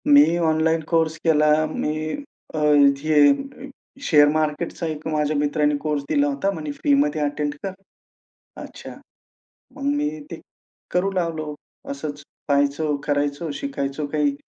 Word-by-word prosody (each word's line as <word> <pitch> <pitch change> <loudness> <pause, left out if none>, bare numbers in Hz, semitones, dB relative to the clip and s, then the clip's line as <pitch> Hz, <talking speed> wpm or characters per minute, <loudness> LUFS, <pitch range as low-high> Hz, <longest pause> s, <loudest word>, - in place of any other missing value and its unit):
मी 150 +4 +6
online 160 -1 +2
course 160 -1 +1
केला. 150 -2 +4 0.2
मी 155 0 -3 0.4
अ, - - -4 0.4
हे 155 - +2 0.3
share 150 - +5
मार्केटचा 155 +3 -1
एक 155 -1 -5
माझ्या 150 -1 0
मित्राने 150 0 +1
कोर्स 150 -1 -2
दिला 285 0 +2
होता. 275 -9 0
म्हणे 155 -5 -5
फ्रीमध्ये 145 +1 +1
अटेंड 145 0 -1
कर. 195 -1 -3 0.9
अच्छा, - - -10 0.8
मग 280 - -9
मी 295 0 0 0.2
ते - - -7 0.5
करू 180 +2 +1
लागलो. 165 -4 -2 0.4
असंच 145 +1 -5 0.3
पहायचो, 145 +1 +1
करायचो 145 +2 -1
शिकायचो 150 - -3
काही. 150 -2 +1
155 Hz, 125 wpm, -22 LUFS, 145-165 Hz, 0.9 s, मी